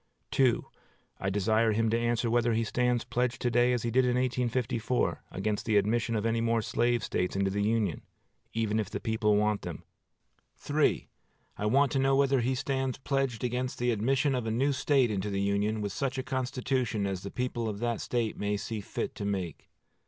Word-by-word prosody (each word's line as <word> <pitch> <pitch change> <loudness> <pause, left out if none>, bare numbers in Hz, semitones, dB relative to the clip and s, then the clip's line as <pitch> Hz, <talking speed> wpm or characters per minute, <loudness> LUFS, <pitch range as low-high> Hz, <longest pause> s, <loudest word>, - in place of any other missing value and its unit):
I 95 - -1
desire 110 +3 +2
him 115 +1 +1
to 115 - +2
answer 120 0 0
whether 120 0 +2
he 115 +1 +1
stands 125 +1 +1
pledged 125 0 -1
to 120 - +1
day, 120 +1 +4
as 125 -2 0
he 120 - -1
did 130 +3 +4
in 125 -1 +2
1854, 125 -1 0
against 105 +3 -2
the 110 -2 +4
admission 115 +3 +1
of 105 0 -1
any 115 0 +1
more 115 -1 +1
slave 120 0 +1
States 90 -3 -1
into 95 0 +1
the 100 +1 -1
Union, 105 -4 0 0.5
even 110 -1 0
if 105 -3 -2
the - - -4
people 110 -2 +1
want 105 0 +1
them. - - -7 1.7
I 105 - -2
want 135 +5 +3
to 135 - +1
know 135 0 +3
whether 135 -1 +3
he 130 +3 0
stands 135 0 -1
pledged 135 -3 -1
against 125 +1 -2
the 120 0 +1
admission 135 +6 +1
of 125 -3 -1
a - - 0
new 135 +5 +1
State 130 -3 +2
into 100 0 -2
the 100 -1 -1
Union 100 +2 0
with 100 -1 -2
such 135 +6 -2
a 130 - -2
constitution 130 -4 -1
as 95 -2 -2
the 100 - -6
people 120 -2 -2
of 105 - -4
that 120 +1 -1
State 115 -3 -2
may 105 0 0
see 110 +1 -4
fit - - -4
to 100 - -5
make. 95 -6 -3
115 Hz, 195 wpm, -29 LUFS, 105-125 Hz, 1.7 s, day